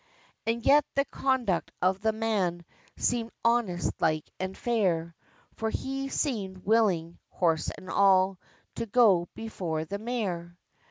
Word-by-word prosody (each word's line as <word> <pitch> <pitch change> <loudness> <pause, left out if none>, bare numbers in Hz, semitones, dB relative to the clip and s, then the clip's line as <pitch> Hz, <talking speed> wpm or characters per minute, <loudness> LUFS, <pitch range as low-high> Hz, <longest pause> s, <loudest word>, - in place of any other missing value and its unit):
And 230 +1 -1
yet 290 +2 +6
the 275 0 +3
conduct 255 -11 0
of 185 +2 +1
the 220 +1 +2
man 200 -6 -1 0.3
Seemed 235 -2 0 0.2
honest 230 -7 +1
like 155 -1 +1
and 190 0 -4
fair; 180 -8 0 0.4
For 225 - -1
he 270 +4 -3
seemed 200 - -2
willing, 190 -6 +2
horse 165 -3 +1
and 185 - -12
all, 190 -1 +4 0.4
To 230 - -3
go 200 -6 +4
before 175 -8 -3
the 200 +5 -5
mare! 190 -7 -3
200 Hz, 130 wpm, -28 LUFS, 175-230 Hz, 0.4 s, yet